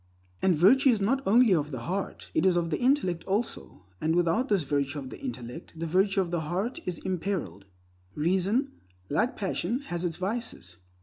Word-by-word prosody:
And 185 -4 +3
virtue 255 - +6
is 230 -4 +3
not 245 +7 +1
only 225 +1 +6
of 150 -4 +1
the 130 -5 -5
heart; 190 +8 -4
it - - +2
is 185 -2 +4
of 170 -1 -1
the 150 - 0
intellect 245 - +1
also; 195 - -3 0.2
and 160 +1 +1
without 175 +10 +2
this 195 -6 +2
virtue 140 +1 -1
of 130 -2 -6
the - - -9
intellect, 125 +7 -7
the 165 - -3
virtue 195 +4 +2
of 175 -2 -3
the 170 - 0
heart 190 - -2
is 175 - -2
imperiled. 185 - -3 0.5
Reason, 190 - +1 0.4
like 195 - 0
passion, 220 +5 -1
has 175 0 -3
its 170 -3 -1
vices. 190 - -5
180 Hz, 185 wpm, -28 LUFS, 160-210 Hz, 0.5 s, virtue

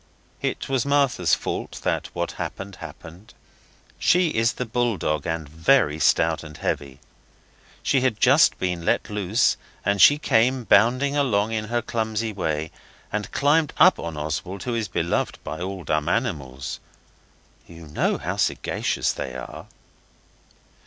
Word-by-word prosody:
It - - -2
was 130 -3 +1
Martha's 140 - +2
fault - - -5
that - - -1
what - - -2
happened 95 -1 -6
happened. 90 +8 -12 0.6
She 180 -1 +3
is 115 -4 +1
the 125 - -4
bull 120 -2 0
dog, 75 -2 -2
and 80 -2 -3
very 80 - +2
stout 80 +2 +2
and 75 -2 -10
heavy. 70 -1 -3 0.8
She 135 - +2
had 125 -5 0
just 135 +5 +5
been 90 -2 -2
let 85 - 0
loose 105 +3 +1 0.3
and 100 -1 +2
she 145 - +8
came 130 -2 +2
bounding 125 +7 +3
along 115 -7 +1
in 110 -1 -2
her 120 +1 -1
clumsy 110 -1 -2
way, 80 -5 -2 0.4
and 105 -1 -3
jumped 150 +2 +2
up 185 - +6
on 85 -2 -5
Oswald, 80 +6 -4
who 125 - -2
is 115 -2 -1
beloved 85 -1 -1
by 80 - -6
all 95 0 -5
dumb 75 +1 0
animals. 70 - -2 0.9
(You 85 -1 -12
know 75 - 0
how - - -4
sagacious - - 0
they 65 - -6
are.) 65 -1 -8
100 Hz, 145 wpm, -24 LUFS, 80-125 Hz, 0.9 s, she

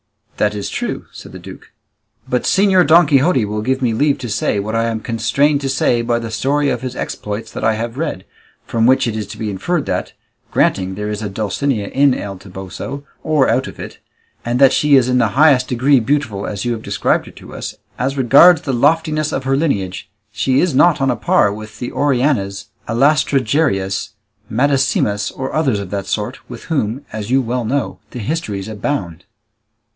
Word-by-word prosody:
"That 105 0 +1
is 100 - -4
true," - - -4
said - - -11
the - - -7
duke; - - -12 0.6
"but 125 -1 0
Señor 190 -4 +3
Don 165 +2 +7
Quixote 140 -3 +3
will 105 +1 -3
give 130 +4 -1
me 120 -2 +1
leave 140 +5 +2
to 125 -2 -6
say 100 0 0
what 105 +2 -4
I 115 0 +1
am 115 -1 -2
constrained 120 +7 +1
to 135 - -2
say 125 -2 +1
by 120 0 0
the 115 -1 -5
story 140 +5 0
of 120 - -2
his 130 -1 -5
exploits 105 +2 -5
that - - -6
I 110 - +3
have 115 +3 -4
read, 95 - -3 0.4
from 115 0 +1
which 130 +1 +4
it 115 -2 -2
is 105 -2 -4
to 100 - -9
be 110 -2 -3
inferred 150 - -2
that, - - -3 0.4
granting 95 -1 +1
there 105 +1 -4
is 105 0 -4
a 105 - -3
Dulcinea 105 +2 -2
in 140 -1 +3
El 100 -2 -6
Toboso, 95 +8 -7 0.2
or 150 -4 +2
out - - +1
of - - -11
it, - - -8 0.4
and 120 +1 -1
that 135 0 +6
she 150 -1 +4
is 130 -2 +4
in 125 0 +2
the 120 - +3
highest 140 -4 +5
degree 130 +2 +3
beautiful 120 -5 -1
as 105 +2 -4
you 120 - 0
have 115 -2 -3
described - - 0
her - - -10
to - - -13
us, - - -6 0.2
as 135 +2 -1
regards 145 +6 +6
the 135 - -2
loftiness 155 +3 +1
of 135 - -2
her 135 +1 +1
lineage 100 - -2 0.2
she 130 +5 +1
is 180 -4 +1
not 165 +5 +4
on 135 -1 +2
a - - -1
par 100 -2 +2
with 105 0 -10
the 120 - -5
Orianas, 125 -8 0 0.2
Alastrajareas, 130 -5 +1 0.4
Madasimas, 125 -5 +1
or 130 0 -5
others 140 -8 +1
of 100 -2 -7
that 100 -1 -3
sort, - - -3
with - - -9
whom, 140 -3 -2
as 110 0 -5
you 130 +2 +3
well 125 +1 -2
know, 135 +5 -2
the - - -9
histories 105 - -3
abound." 100 - -4
125 Hz, 200 wpm, -17 LUFS, 105-140 Hz, 0.6 s, Don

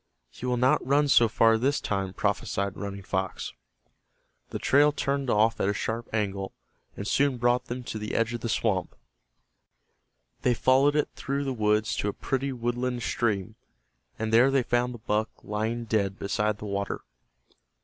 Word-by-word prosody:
"He 125 - -6
will 125 0 +1
not 125 +2 +3
run 145 +3 +3
so 120 -3 +6
far 115 0 +4
this 140 +4 +1
time," 95 -2 -2
prophesied 100 -1 -1
Running 100 -1 -6
Fox. 95 -1 -3 1.0
The - - -4
trail 145 +2 +4
turned 140 -2 -1
off 110 +1 +3
at 95 - +2
a 100 - 0
sharp 115 +3 -3
angle, 100 -3 -2 0.4
and 100 - -4
soon 140 0 +2
brought 120 +1 +2
them 125 +1 -5
to 110 - -5
the 105 0 -4
edge 115 +1 +1
of 120 - -4
the 115 - -3
swamp. 105 -4 0 1.5
They 125 -1 +2
followed 135 +5 +4
it 150 - +1
through 140 +1 -2
the 135 -1 -2
woods 105 -1 +1
to - - -1
a 100 - -1
pretty 135 +1 -2
woodland 120 0 -2
stream, 110 -3 -1 0.6
and 110 0 -2
there 120 +4 +6
they 135 -1 +2
found 120 +1 0
the - - -8
buck 110 0 -1
lying 110 +3 -2
dead 100 -3 0
beside 105 +1 -1
the 105 - -8
water. 100 0 -3
115 Hz, 170 wpm, -27 LUFS, 105-125 Hz, 1.5 s, so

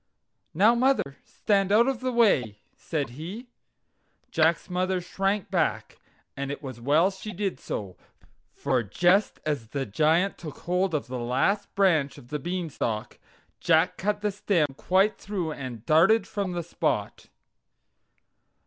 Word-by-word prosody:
"Now, 210 +7 +5
mother, 240 - +1
stand 195 -2 0
out 230 +4 +5
of 270 -3 -1
the 255 0 -2
way!" 165 - +3 0.2
said 150 -6 -3
he. 185 - -8 0.8
Jack's 165 0 +2
mother 185 +1 0
shrank 195 +2 -2
back, - - -1 0.4
and 140 0 -4
it 145 - -6
was 130 -4 -7
well 155 +9 +3
she 195 +3 -8
did 195 0 -3
so, 95 -4 -5 0.5
for 130 -2 0
just 175 - +2
as 145 -7 -2
the 135 +4 -3
Giant 160 - +1
took 155 -4 -8
hold 180 0 0
of 150 - -1
the 125 0 -5
last 130 - 0
branch 165 -8 +2
of 120 - -14
the 150 - -3
Beanstalk, 155 -10 -3 0.4
Jack 165 +1 +3
cut 205 +2 -1
the 210 0 0
stem 175 -8 0
quite 195 +7 +2
through 185 -6 -3
and 125 -6 -7
darted 170 +9 +4
from 200 -3 -3
the 175 -1 -3
spot. 170 - -2
175 Hz, 145 wpm, -26 LUFS, 140-200 Hz, 0.8 s, Now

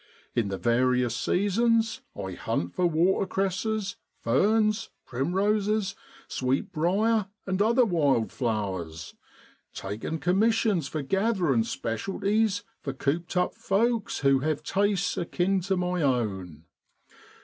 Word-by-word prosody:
In 115 -4 +1
the 95 -1 -3
various 125 +1 +2
seasons 225 - +1 0.2
I 95 -1 -4
hunt 85 -1 -3
for 180 - +2
watercresses, 190 +4 0 0.2
ferns, 215 - +2 0.2
primroses, 195 - 0 0.3
sweetbriar, 185 - +1 0.2
and 190 0 -1
other 235 +4 +4
wild 145 - +2
flowers, 95 -9 -3 0.6
taking 105 +11 -4
commissions 200 - +2
for 150 +1 -4
gathering 190 - +1
specialties 200 - -1 0.2
for 135 - -4
cooped 160 +7 -2
up 180 - +1
folks 225 +2 0
who 135 -1 +4
have 155 +2 -1
tastes 200 +1 0
akin 180 +3 0
to 190 +1 -1
my 180 -1 -1
own. 95 - -1
180 Hz, 105 wpm, -27 LUFS, 125-205 Hz, 0.6 s, other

